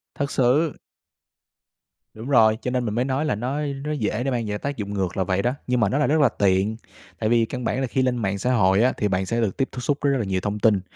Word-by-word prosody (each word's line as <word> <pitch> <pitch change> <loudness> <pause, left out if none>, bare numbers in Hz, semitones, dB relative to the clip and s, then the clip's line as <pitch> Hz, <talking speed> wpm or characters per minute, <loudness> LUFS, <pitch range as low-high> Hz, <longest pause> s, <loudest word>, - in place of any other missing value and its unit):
Thật 140 -2 -2
sự. 135 +5 +2 1.4
Đúng 110 +5 -8
rồi, 110 -5 +5
cho 125 - -2
nên 125 -1 -1
mình 105 0 -2
mới 125 +2 +1
nói 135 +3 -1
là 130 - 0
nó 125 +6 -3
á, 150 - -2 0.2
nó 150 - -3
dễ 120 -4 -1
để 135 - -1
mang 120 -2 -1
về 105 0 -2
tác 140 +6 -4
dụng 100 -1 -4
ngược 95 -2 -2
là 95 - +2
vậy 95 +2 0
đó, 120 - +1 0.2
nhưng 125 0 +1
mà 100 -4 +2
nó 135 - 0
là 150 - +2
rất 155 +2 +2
là 140 - +5
tiện. 100 +1 +1 0.4
Tại 110 - 0
vì 115 -1 +3
căn 125 +1 -6
bản 130 +3 -1
là 130 - 0
khi 130 - 0
lên 125 -1 +1
mạng 100 -3 -1
xã 125 +6 0
hội 95 -2 +3
á 130 - +3
thì 105 - 0
bạn 95 -1 0
sẽ 115 +5 -1
được 105 -4 -1
tiếp 135 -1 0
tiếp - - -7
xúc 145 +2 0
với 140 - +2
rất 135 - +1
là 115 - -2
nhiều 95 -1 -1
thông 105 0 -3
tin 105 -3 +3
115 Hz, 295 wpm, -23 LUFS, 105-130 Hz, 1.4 s, rồi